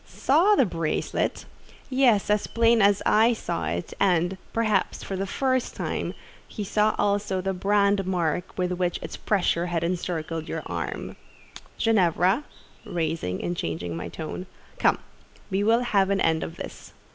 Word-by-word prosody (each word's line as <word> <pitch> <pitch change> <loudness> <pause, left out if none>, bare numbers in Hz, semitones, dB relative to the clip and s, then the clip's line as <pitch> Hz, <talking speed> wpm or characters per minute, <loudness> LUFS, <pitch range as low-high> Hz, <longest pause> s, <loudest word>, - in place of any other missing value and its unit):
"Saw 345 +10 +3
the 270 - +4
bracelet? 165 -5 -2 0.4
Yes, 250 -7 +3
as 210 0 +1
plain 230 -1 +3
as 200 0 +4
I 225 +3 +5
saw 85 - -3
it: 85 +2 -3
and, 180 -1 +2 0.2
perhaps, 225 -2 0
for 195 - -4
the 195 +1 -2
first 260 +3 0
time, - - -3 0.3
he 210 - -5
saw 210 +2 +2
also 200 -2 +1
the 190 +1 -1
brand 200 0 +2
mark 175 -2 -1
with 180 -1 0
which 180 -1 0
its - - -6
pressure 180 -4 +1
has 170 -2 -1
encircled 165 -2 -3
your - - -3
arm. - - -5 0.6
Ginevra" 195 - +3 0.4
(rising, 160 - -2
and 175 - -2
changing 85 - -3
my 85 - -5
tone), 165 +3 -6 0.3
"come, - - +4 0.5
we 195 +2 +1
will 230 +3 +4
have 200 -5 +2
an 200 0 +1
end 160 -1 +2
of 165 - -6
this. - - -9
190 Hz, 155 wpm, -25 LUFS, 170-215 Hz, 0.6 s, I